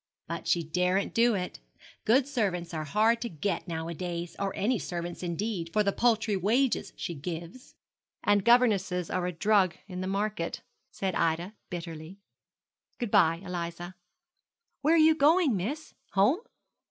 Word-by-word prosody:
But 170 Hz, +1 st, -5 dB
she 170 Hz, -, +2 dB
daren't 180 Hz, +4 st, +1 dB
do 230 Hz, -1 st, +4 dB
it. 180 Hz, -, -4 dB, 0.5 s
Good 250 Hz, +4 st, +4 dB
servants 190 Hz, -11 st, -1 dB
are 155 Hz, -1 st, -3 dB
hard 220 Hz, +9 st, +2 dB
to 235 Hz, -, -3 dB
get 165 Hz, +3 st, -3 dB
nowadays; 170 Hz, +1 st, -4 dB
or 200 Hz, -1 st, -1 dB
any 230 Hz, +2 st, +1 dB
servants, 175 Hz, 0 st, -5 dB
indeed, 175 Hz, 0 st, -3 dB
for 210 Hz, +3 st, +2 dB
the 200 Hz, -, +2 dB
paltry 220 Hz, -2 st, +2 dB
wages 230 Hz, +8 st, +1 dB
she 170 Hz, -, -4 dB
gives.' 170 Hz, -, -7 dB, 0.5 s
'And 205 Hz, -1 st, +3 dB
governesses 195 Hz, -7 st, +3 dB
are 180 Hz, -1 st, 0 dB
a -, -, -1 dB
drug 195 Hz, +1 st, +2 dB
in 185 Hz, -2 st, -6 dB
the 185 Hz, -, -3 dB
market,' 200 Hz, -3 st, -2 dB, 0.3 s
said 190 Hz, -1 st, -3 dB
Ida, 170 Hz, +4 st, 0 dB, 0.2 s
bitterly. 165 Hz, 0 st, -7 dB, 0.8 s
'Good 240 Hz, -5 st, -3 dB
bye, 165 Hz, +1 st, +4 dB
Eliza.' 175 Hz, 0 st, -5 dB, 0.9 s
'Where 310 Hz, +4 st, +4 dB
are -, -, +5 dB
you 315 Hz, 0 st, +6 dB
going, 310 Hz, -, +4 dB
miss? 270 Hz, -, -4 dB, 0.2 s
Home?' 210 Hz, -, +3 dB
190 Hz, 150 wpm, -29 LUFS, 170-225 Hz, 0.9 s, you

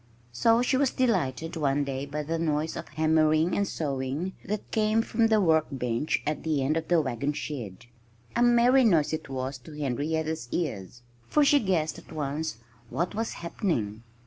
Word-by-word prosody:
So 230 Hz, -, +3 dB
she 260 Hz, +1 st, +2 dB
was 275 Hz, -1 st, +3 dB
delighted 165 Hz, -, 0 dB
one 145 Hz, -2 st, +1 dB
day 135 Hz, 0 st, -4 dB
by 150 Hz, +2 st, -3 dB
the 165 Hz, +2 st, -2 dB
noise 155 Hz, -1 st, -1 dB
of -, -, -6 dB
hammering 155 Hz, +2 st, +2 dB
and 200 Hz, -1 st, +1 dB
sawing 140 Hz, +4 st, -3 dB
that 210 Hz, +1 st, -4 dB
came 220 Hz, +1 st, +2 dB
from 225 Hz, 0 st, +2 dB
the 220 Hz, -1 st, +3 dB
workbench 150 Hz, -, +1 dB
at 150 Hz, -1 st, -1 dB
the 155 Hz, -4 st, 0 dB
end 145 Hz, +4 st, +1 dB
of 160 Hz, 0 st, -2 dB
the 175 Hz, -2 st, +4 dB
wagon 140 Hz, 0 st, -1 dB
shed. 115 Hz, -9 st, -6 dB, 0.5 s
A 240 Hz, -, +2 dB
merry 240 Hz, +2 st, +5 dB
noise 165 Hz, -10 st, +3 dB
it 155 Hz, -2 st, -4 dB
was, 130 Hz, 0 st, -4 dB
to 150 Hz, +4 st, -12 dB
Henrietta's 150 Hz, +1 st, -2 dB
ears; 120 Hz, -, -3 dB, 0.2 s
for 300 Hz, -1 st, +3 dB
she 285 Hz, +1 st, +5 dB
guessed 175 Hz, -, 0 dB
at -, -, -17 dB
once 150 Hz, -2 st, -3 dB, 0.3 s
what 175 Hz, +2 st, -2 dB
was 225 Hz, +2 st, -2 dB
happening. 115 Hz, -, -2 dB
155 Hz, 170 wpm, -27 LUFS, 140-190 Hz, 0.5 s, merry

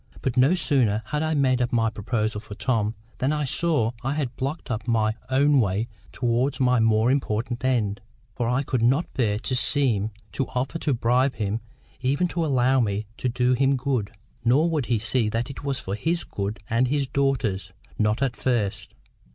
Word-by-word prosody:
But 130 Hz, -2 st, -1 dB
no 135 Hz, +8 st, +5 dB
sooner 125 Hz, -, +1 dB
had 150 Hz, +6 st, -2 dB
I 160 Hz, 0 st, 0 dB
made 130 Hz, -3 st, +2 dB
up 125 Hz, -, 0 dB
my 115 Hz, -2 st, +2 dB
proposal 110 Hz, -1 st, -2 dB
for 105 Hz, -1 st, -9 dB
Tom 110 Hz, -2 st, 0 dB, 0.2 s
than 130 Hz, +3 st, +1 dB
I 150 Hz, -1 st, 0 dB
saw 140 Hz, -4 st, +1 dB
I 135 Hz, +3 st, -1 dB
had 135 Hz, -6 st, -2 dB
blocked 140 Hz, +3 st, -4 dB
up 110 Hz, 0 st, -3 dB
my 110 Hz, -2 st, +2 dB, 0.2 s
own 140 Hz, +2 st, +4 dB
way 105 Hz, +1 st, 0 dB, 0.2 s
towards 125 Hz, +3 st, 0 dB
my 125 Hz, -2 st, +3 dB
more 110 Hz, +2 st, +3 dB
important 120 Hz, -2 st, -1 dB
end. 110 Hz, -6 st, 0 dB, 0.3 s
For 120 Hz, +2 st, -1 dB
I 125 Hz, +3 st, +1 dB
could 130 Hz, -3 st, -1 dB
not 135 Hz, +8 st, +2 dB
bear 105 Hz, -5 st, +1 dB
to 130 Hz, +4 st, -2 dB
seem 120 Hz, -4 st, +3 dB, 0.2 s
to 130 Hz, +5 st, -2 dB
offer 130 Hz, +6 st, -1 dB
to 145 Hz, -5 st, 0 dB
bribe 125 Hz, +3 st, +2 dB
him 105 Hz, 0 st, -2 dB, 0.4 s
even 140 Hz, +7 st, +1 dB
to 170 Hz, -1 st, -1 dB
allow 130 Hz, -3 st, +3 dB
me 105 Hz, -2 st, 0 dB
to 125 Hz, -, -1 dB
do 125 Hz, +1 st, +2 dB
him 135 Hz, +2 st, +2 dB
good. 125 Hz, -6 st, -1 dB, 0.3 s
Nor 145 Hz, +8 st, +3 dB
would 150 Hz, -6 st, -1 dB
he 120 Hz, -, +2 dB
see 115 Hz, +1 st, +1 dB
that 115 Hz, +5 st, -2 dB
it 135 Hz, -, -10 dB
was 140 Hz, -2 st, -1 dB
for 95 Hz, -, -5 dB
his 165 Hz, +11 st, -1 dB
good 100 Hz, +1 st, -4 dB
and 115 Hz, +3 st, +2 dB
his 140 Hz, +1 st, +1 dB
daughter's—not 110 Hz, -4 st, -1 dB
at 130 Hz, -3 st, -1 dB
first. 110 Hz, -, -1 dB
125 Hz, 190 wpm, -25 LUFS, 110-135 Hz, 0.4 s, no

